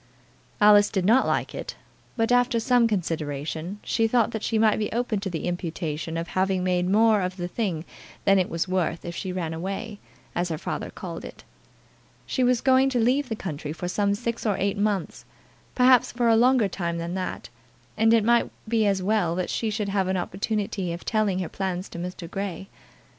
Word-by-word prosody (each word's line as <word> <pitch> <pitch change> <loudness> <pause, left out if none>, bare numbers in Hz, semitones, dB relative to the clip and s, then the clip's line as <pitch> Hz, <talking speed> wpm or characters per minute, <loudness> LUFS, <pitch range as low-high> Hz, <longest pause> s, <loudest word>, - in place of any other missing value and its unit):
Alice 205 -1 +6
did 190 -3 -1
not 235 +6 +4
like - - -1
it, - - -6 0.4
but, 225 +1 +1
after 245 -1 +3
some 245 0 +3
consideration, 160 -2 -3
she 225 -1 +1
thought 235 0 +2
that 220 - -4
she 225 - 0
might 215 -1 +3
be 210 - -2
open 235 -3 -1
to 195 -1 -4
the 165 -3 -4
imputation 165 -2 -3
of 165 +1 -4
having 190 -1 0
made 180 0 +1
more 215 +1 +4
of 185 +1 -3
the 175 -1 -3
thing 175 -5 -2 0.4
than 195 -1 +5
it 185 - 0
was 165 +2 -2
worth 180 -3 -1
if 170 0 -5
she 185 - -4
ran 170 -3 -3
away, 195 +5 -5 0.3
as 175 0 -1
her 160 - -2
father - - -4
called - - -7
it. - - -10 0.8
She 260 - 0
was 245 -1 +3
going 265 0 +4
to 250 -2 0
leave 255 +4 +2
the 220 - -1
country 155 -7 -5
for 170 +3 -5
some 200 +2 +1
six 235 +1 -3
or 210 -3 +1
eight 200 +1 0
months, 205 -3 -1 0.5
perhaps 255 -1 +5
for 240 0 0
a 225 - +5
longer 245 -1 +4
time 170 -3 -3
than 170 +1 -4
that, 185 -1 -4 0.5
and 225 +1 +3
it 230 -2 +4
might 235 +2 +3 0.2
be 220 -1 +2
as 195 -2 +1
well 195 -4 +1
that 180 0 -2
she 225 - -1
should 210 -1 -2
have 195 -2 0
an 190 0 0
opportunity 195 0 -2
of 170 - -8
telling 215 -4 +1
her 185 -2 -2
plans 185 0 -3
to 170 - -8
Mr. 180 -1 -6
Grey. 195 0 -5
195 Hz, 200 wpm, -25 LUFS, 180-225 Hz, 0.8 s, Alice